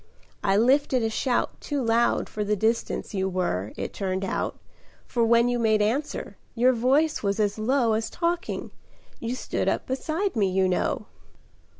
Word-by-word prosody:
I 195 0 +3
lifted 255 +2 +3
a 225 - 0
shout 245 +2 -1
Too 290 -1 -2
loud 230 +1 +2
for 210 - -3
the 210 +1 +1
distance 220 +2 -1
you 190 -1 0
were, 110 - -1
it - - -4
turned 190 -1 -2
out, - - -2 0.5
For 235 - 0
when 235 +1 +4
you 245 0 0
made 220 -2 +3
answer, 240 +9 -1 0.2
your 250 +2 +4
voice 275 +7 +2
was 200 0 -1
as 205 0 0
low 235 0 +2
As 220 +1 -1
talking 345 0 -2 0.5
you 235 +2 -3
stood - - -1
up - - -1
beside 315 +8 -2
me, 200 -4 +2
you 190 0 +2
know." 180 - 0
230 Hz, 170 wpm, -26 LUFS, 205-255 Hz, 0.5 s, when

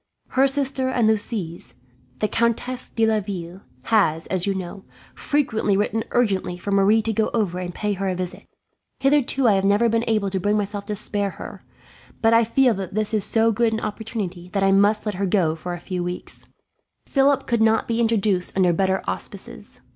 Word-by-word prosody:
Her 265 +1 +3
sister 270 -1 0
and 240 -4 +2
Lucie's, 205 -6 -2 0.4
the 215 - 0
Countess 235 +3 -1
de 225 - +1
Laville, 195 -4 -2 0.2
has, 165 -7 +2
as 185 0 -2
you 195 - 0
know, 190 +1 -6 0.3
frequently 220 -9 0
written 210 +2 0
urgently 190 -7 0
for 200 +3 -5
Marie 200 +3 +4
to 225 - -1
go 215 +1 +1
over 190 -6 0
and 180 -1 -4
pay 210 +3 -2
her 195 0 -3
a 185 - -1
visit. 180 0 -6 0.5
Hitherto 275 -2 +2
I 215 - +5
have 195 -1 +1
never 205 +4 +3
been 230 +1 +1
able 215 -3 +1
to 190 - -1
bring 205 +3 +1
myself 205 -1 -3
to 210 - -2
spare 205 0 -2
her, - - -10 0.6
but 225 0 +3
I 230 +1 +6
feel 250 +2 +3
that 190 -1 -6
this 215 0 0
is 215 -2 +1
so 225 +2 +2
good 225 +1 +1
an 220 - -1
opportunity 205 -5 -5
that 195 -1 +1
I 195 - +4
must 205 +3 +3
let 210 - -1
her 195 +1 -2
go 175 -5 +2
for 175 +2 -5
a - - -9
few 180 0 -4
weeks. 180 +1 -4 0.6
"Philip 275 -1 +2
could 235 -2 0
not 220 0 +3
be 230 0 -1
introduced 210 -6 +1
under 180 -2 +4
better 190 +2 0
auspices. - - -7
210 Hz, 195 wpm, -22 LUFS, 190-225 Hz, 0.6 s, I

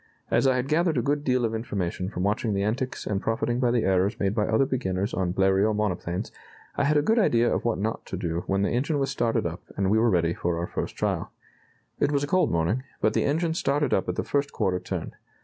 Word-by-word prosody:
As - - +3
I 130 - +3
had 125 +1 -1
gathered 160 +1 +2
a - - +3
good 145 +1 0
deal 125 -3 +2
of 115 - -2
information 95 -5 -3
from 90 - -4
watching 105 +1 0
the 100 - 0
antics 125 +5 -2
and 100 -2 -1
profiting 120 +2 -1
by 125 -2 +2
the 120 -1 +2
errors 95 +1 +1
made 100 0 +1
by 105 -1 0
other 110 +5 +3
beginners 100 -7 -2
on 90 -2 0
Bleriot 95 +3 +2
monoplanes, 95 -1 -2 0.4
I 140 - +1
had 150 +1 +3
a 145 - +3
good 225 +8 +3
idea 120 - +3
of - - -2
what 120 - +1
not 110 +4 -2
to 95 - -4
do 85 -2 -2
when 95 +1 +1
the - - +1
engine 140 +6 0
was 135 -1 0
started 115 -3 0
up - - -4 0.2
and 95 0 +1
we 110 - +4
were 115 +1 +4
ready 85 -4 +2
for 85 -1 -2
our 85 - -1
first - - -4
trial.... - - -2 0.7
It - - +2
was 140 -1 +1
a - - -1
cold 185 +5 +2
morning, 85 +9 0 0.2
but 110 - +2
the - - +1
engine 160 +3 +1
started 145 -1 0
up - - +1
at - - -1
the - - -1
first 140 0 -1
quarter 90 -1 0
turn. - - -5
110 Hz, 250 wpm, -26 LUFS, 95-135 Hz, 0.7 s, we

